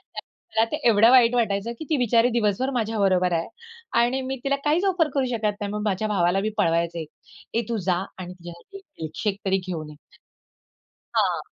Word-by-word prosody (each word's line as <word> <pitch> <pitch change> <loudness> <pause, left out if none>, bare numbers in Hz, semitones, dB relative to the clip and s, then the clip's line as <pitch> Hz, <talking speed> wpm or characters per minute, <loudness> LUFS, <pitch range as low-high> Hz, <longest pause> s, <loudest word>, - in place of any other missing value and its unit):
त्यात 225 +1 -3
त्यात 300 - -2
एवढं 225 +1 +6
वाईट 245 -2 +6
वाटायचं 220 -1 0
की 315 - -6
ती 310 - +2
बिचारी 240 0 +3
दिवसभर 235 +3 +1
माझ्याबरोबर 195 -5 +1
आहे. 165 0 -1 0.5
आणि 255 +3 +1
मी 270 - -2
तिला 275 0 +1
काहीच 320 +6 +2
ऑफर 350 -5 +2
करू 275 -2 +1
शकत 210 -2 -1
नाही. 200 0 -3
मग 210 - -3
माझ्या 205 +2 0
भावाला 190 -2 +2
मी 215 - -1
पळवायचे, 170 -3 0 0.5
"ए 230 - +2
तू 230 - -1
जा 180 - +4 0.2
आणि 180 0 -7
तिच्यासाठी 175 - -12
एक 390 - -16 0.2
मिल्कशेक 195 +6 -3
तरी 195 0 +2
घेऊन 160 -4 -5
ये." 150 - -13 1.2
हां, - - +2
210 Hz, 180 wpm, -24 LUFS, 180-245 Hz, 1.2 s, एवढं